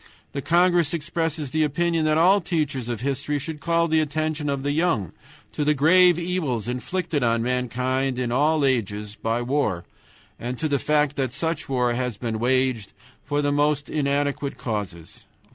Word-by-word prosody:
The 140 - -4
congress 175 +1 +3
expresses 165 -3 -3
the 155 +2 +2
opinion 165 +2 0
that 155 0 +2
all 190 +5 +5
teachers 145 -8 -2
of 120 -2 -3
history 140 +2 -1
should 150 +2 -5
call 170 +1 +1
the 160 -1 +2
attention 155 0 -1
of 140 -1 -2
the 145 - 0
young 145 - 0 0.4
to 150 - -2
the 150 +1 +2
grave 175 +4 +5
evils 170 - -2
inflicted 150 +5 -2
on 115 -1 +1
mankind 125 +1 -1
in 125 -2 -2
all 150 +3 +2
ages 105 -5 -1
by 115 +2 -2
war, 120 -9 -1 0.5
and 125 +2 -4
to 155 - -1
the 140 -2 0
fact 150 0 +1
that 130 -3 -1
such 165 -2 -3
war 125 -2 +1
has 125 -3 -2
been 115 -2 -3
waged 130 -3 0 0.3
for 145 +1 -1
most 145 0 +1
inadequate 140 -1 -1
causes. 100 -8 -5
140 Hz, 165 wpm, -24 LUFS, 125-155 Hz, 0.5 s, all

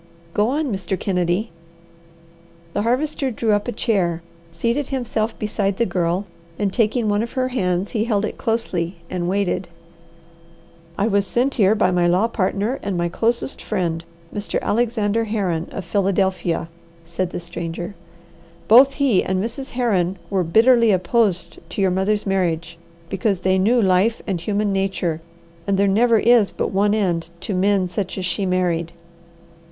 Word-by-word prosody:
Go 210 +1 +2
on, 290 0 -1
Mr. 190 -1 -3
Kennedy." 180 +2 0 1.2
The - - 0
Harvester 265 +4 0
drew 225 -2 -1
up 205 +1 +1
a - - -1
chair, 185 -8 0 0.3
seated 235 +12 -1
himself 240 -4 -2
beside 200 -2 -1
the 235 - +2
Girl, 175 +1 -1 0.3
and 200 -2 -1
taking 225 0 +1
one 205 0 +2
of 235 - -5
her 255 -1 0
hands, 185 -6 -1
he 220 -2 0
held 215 -3 +1
it - - -5
closely 195 -7 -1
and 175 -1 -2
waited. 195 -1 0 1.3
"I 200 - +1
was 200 -2 +1
sent 250 +7 +1
here 210 -1 +3
by 185 - +2
my 175 -1 +2
law 185 +6 +3
partner 215 +3 -1
and 195 -3 -2
my 170 0 0
closest 235 +7 -1
friend, 170 -5 -2 0.3
Mr. 205 0 -2
Alexander 225 -1 +1
Herron, 190 -7 -1
of 190 - -6
Philadelphia," 190 -2 0 0.4
said 170 +2 -2
the - - -5
stranger. 175 +2 -5 0.7
"Both 260 +5 +7
he 270 -9 +2
and 190 - -1
Mrs. 235 +6 -4
Herron 195 -7 0
were 190 -2 +2
bitterly 230 +7 +5
opposed 190 0 +1
to - - -6
your 190 -2 +3
mother's 200 +3 0
marriage, 170 -4 -1 0.3
because 195 +1 -1
they 190 0 +2
knew 230 +6 +3
life 195 +2 +3
and 185 -4 -2
human 205 +2 0
nature, 190 -4 -1 0.5
and 200 -1 +2
there 200 +1 +3
never 225 +4 +4
is 225 -1 +4
but - - -2
one 205 +2 +2
end 175 -6 0
to 200 - -3
men 195 0 +2
such 180 +2 -4
as 185 - -2
she 185 +2 -1
married." 170 -2 0
200 Hz, 160 wpm, -21 LUFS, 180-225 Hz, 1.3 s, Both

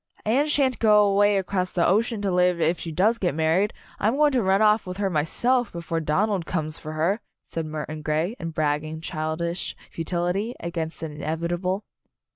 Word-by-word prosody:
"Anne 260 +8 +2
shan't 275 -4 +2
go 210 -2 +6
away 205 0 +4
across 185 -1 -1
the 170 - +1
ocean 215 +3 +1
to 195 - +1
live, 180 -1 +3
if 165 +1 +1
she 165 - -5
does 205 +9 +2
get 175 -7 0
married! 165 +6 +2 0.3
I'm 220 +5 +2
go 300 - +5
ing 295 - +4
to 255 -3 +2
run 190 -1 +3
off 215 -1 +3
with 180 0 -5
her 200 -1 0
myself 235 - +1
before 170 -1 -3
Don 160 +7 +1
ald 195 -6 -2
comes 155 -3 -2
for 155 0 -7
her," 175 +8 0 0.2
said 165 -1 -5
Murton 155 0 -5
Grey, 155 +7 -1
in 165 - -4
bragging, 155 0 -1
childish 165 +2 -3 0.2
futility 180 +7 -2
against 165 -1 -4
the - - -2
in 150 -1 -8
evitable. 175 +5 -2
180 Hz, 195 wpm, -25 LUFS, 160-205 Hz, 0.3 s, go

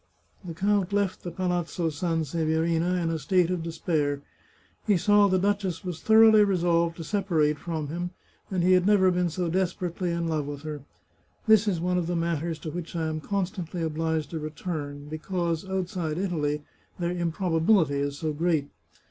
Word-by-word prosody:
The 170 -3 -7
count 200 +1 +1
left 200 -2 0
the 175 - -5
Palazzo 175 -1 -1
Sanseverina 165 +2 0
in 170 -2 0
a 160 - -2
state 180 +4 +2
of 180 -2 -1
despair. 155 -3 -1 0.6
He 205 -3 +4
saw 205 +3 +5
the 185 -1 +2
duchess 195 -1 0
was 175 -3 -5
thoroughly 220 -1 +7
resolved 170 -3 +1
to 165 - -5
separate 160 -5 +1
from 160 -4 -4
him, 175 +3 -3 0.4
and 185 -3 0
he 185 - +4
had 185 0 +4
never 190 -3 +5
been 180 -1 +1
so 175 +2 -2
desperately 180 0 -1
in 170 0 -1
love 155 -3 -1
with 145 0 -6
her. 150 -2 -5 0.6
This 220 -1 +5
is 185 -5 +1
one 180 +1 +1
of 170 - -2
the 175 - -1
matters 165 -1 -1
to 155 - -5
which 175 0 -6
I 165 -1 -1
am 155 0 -3
constantly 180 -2 -3
obliged 160 -1 -1
to 165 - -3
return, 150 -2 -5
because, 170 +2 -3
outside 180 -4 -2
Italy, 150 -6 -1 0.3
their 175 -1 -1
improbability 170 -2 +2
is 140 0 -2
so 155 0 -2
great. 155 -2 0
170 Hz, 175 wpm, -27 LUFS, 160-185 Hz, 0.6 s, thoroughly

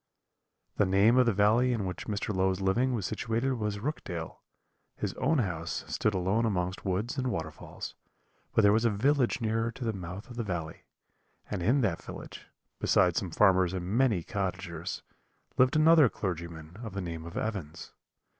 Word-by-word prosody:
"The 105 - +3
name 100 +6 +4
of 125 -1 +5
the - - +5
valley 110 +5 +3
in 110 -5 -1
which 90 -1 -5
Mr. 105 0 -2
Low's 95 0 +1
living 120 +7 +1
was 105 -5 -2
situated 115 +3 -1
was 105 -4 -2
Rookdale; 100 - -5 0.6
his - - -3
own 150 +5 +1
house 85 - -2
stood 105 -2 0
alone 95 +5 +1
amongst 95 -4 -1
woods 105 +8 -1
and 130 - -1
waterfalls, 80 -7 -6 0.6
but 110 - +3
there 100 0 +6
was 110 +1 +2
a 115 - +4
village 125 +4 +1
nearer 115 +1 0
to 130 - -7
the 110 - 0
mouth 95 +1 -7
of 120 - -11
the 120 - -1
valley, 85 -6 -5 0.7
and 100 -4 -2
in 125 +10 +3
that 95 -8 0
village, - - -9 0.3
besides 90 -3 +3
some 95 - -5
farmers 95 0 +4
and 90 -2 -3
many 120 -9 +3
cottagers, 90 -3 -4 0.6
lived 130 +2 +5
another 155 -3 +6
clergyman 85 -3 -5
of 110 -3 -7
the 100 - -2
name 85 -2 -5
of 85 0 -8
Evans. 95 -8 -4
100 Hz, 175 wpm, -29 LUFS, 90-115 Hz, 0.7 s, there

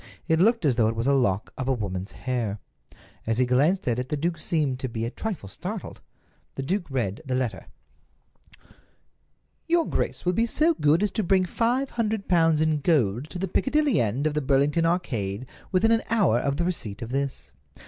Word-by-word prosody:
It 160 -1 +2
looked 225 0 +3
as 130 -5 +2
though 115 -3 +4
it 115 - -1
was 115 +1 -2
a 140 - +3
lock 110 -7 +1
of 130 - -2
a 135 - +3
woman's 95 -5 -4
hair. 120 -5 -2 0.7
As 115 0 +1
he 130 - +3
glanced 145 +10 +2
at 120 0 +1
it 125 - -4
the 150 - -1
duke 165 +2 -1
seemed 150 -6 0
to 130 - -3
be 115 0 -3
a 115 - -3
trifle 195 - -5
startled. 95 - -7 0.5
The 135 - -3
duke 180 +5 -2
read 120 -5 -2
the 130 -4 -2
letter: 125 -3 -2 2.0
"Your 335 -1 +2
grace - - -2
will 180 - +2
be 230 +5 +1
so 315 +7 +3
good 160 - +2
as 205 - +1
to 220 - -1
bring 185 0 +3
five 245 +8 0
hundred 220 -3 -2
pounds 165 -3 +3
in 155 -1 +2
gold 135 - +1
to - - -6
the 195 +2 -2
Piccadilly 285 - +2
end 120 +6 -1
of 155 - +1
the 150 - 0
Burlington 145 +4 +2
Arcade 120 - -2 0.3
within 195 +4 +3
an 225 0 +3
hour 205 - +3
of 140 +2 -1
the 170 - 0
receipt 115 - -3
of 115 - -7
this. 135 - -3
145 Hz, 200 wpm, -25 LUFS, 120-185 Hz, 2.0 s, though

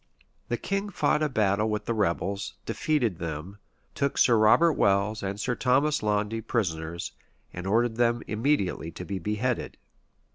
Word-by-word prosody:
[*] - - -41
The 120 - 0
king 195 - -2
fought 150 -5 +1
a 155 - +1
battle 105 -3 +1
with 105 -1 -2
the 115 - 0
rebels, 100 -1 -1
defeated 115 - 0
them, 85 +5 -6 0.3
took 140 -1 -1
Sir 120 - +5
Robert 110 +10 +5
Welles 100 -1 +2
and 100 +1 -4
Sir 125 - 0
Thomas 135 +5 +2
Launde 105 +1 0
prisoners, 85 -6 -2 0.4
and 90 +1 -6
ordered 115 +2 +2
them 120 0 +2
immediately 110 - 0
to 90 - -7
be 95 -1 -4
beheaded. 105 +6 -2
110 Hz, 155 wpm, -27 LUFS, 100-125 Hz, 0.4 s, Sir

